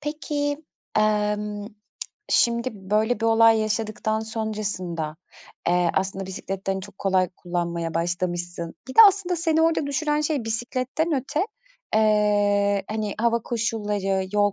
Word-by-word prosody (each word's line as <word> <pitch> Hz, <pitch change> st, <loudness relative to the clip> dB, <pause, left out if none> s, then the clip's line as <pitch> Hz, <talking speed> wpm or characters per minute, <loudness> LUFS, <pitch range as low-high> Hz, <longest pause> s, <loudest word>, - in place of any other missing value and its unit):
Peki, 295 Hz, 0 st, -3 dB, 0.3 s
emm, 210 Hz, -1 st, 0 dB, 0.6 s
şimdi 235 Hz, +1 st, +3 dB
böyle 210 Hz, +4 st, 0 dB
bir 225 Hz, -, -1 dB
olay 225 Hz, 0 st, +5 dB
yaşadıktan 215 Hz, 0 st, -1 dB
sonrasında, 205 Hz, -8 st, -3 dB, 0.5 s
eee, 175 Hz, -1 st, +3 dB
aslında 190 Hz, 0 st, -1 dB
bisikleti 190 Hz, +1 st, -6 dB
de, 195 Hz, -, +2 dB
hani, 190 Hz, -, -3 dB
çok 195 Hz, 0 st, -12 dB
kolay 185 Hz, -2 st, +2 dB
kullanmaya 170 Hz, -2 st, -3 dB
başlamışsın 175 Hz, 0 st, -2 dB
Bir 260 Hz, -, -7 dB
de -, -, -11 dB
aslında 370 Hz, -3 st, -1 dB
seni 320 Hz, -1 st, +2 dB
orada 325 Hz, -3 st, +2 dB
düşüren 295 Hz, +1 st, 0 dB
şey 300 Hz, -5 st, -1 dB
bisikletten 255 Hz, +8 st, -1 dB
öte, 295 Hz, -, -1 dB, 0.5 s
eee, 205 Hz, -2 st, +3 dB
hani, 215 Hz, -1 st, -2 dB
hava 235 Hz, 0 st, +2 dB
koşulları, 210 Hz, -5 st, -1 dB
yol 205 Hz, -1 st, +3 dB
215 Hz, 130 wpm, -24 LUFS, 190-240 Hz, 0.6 s, olay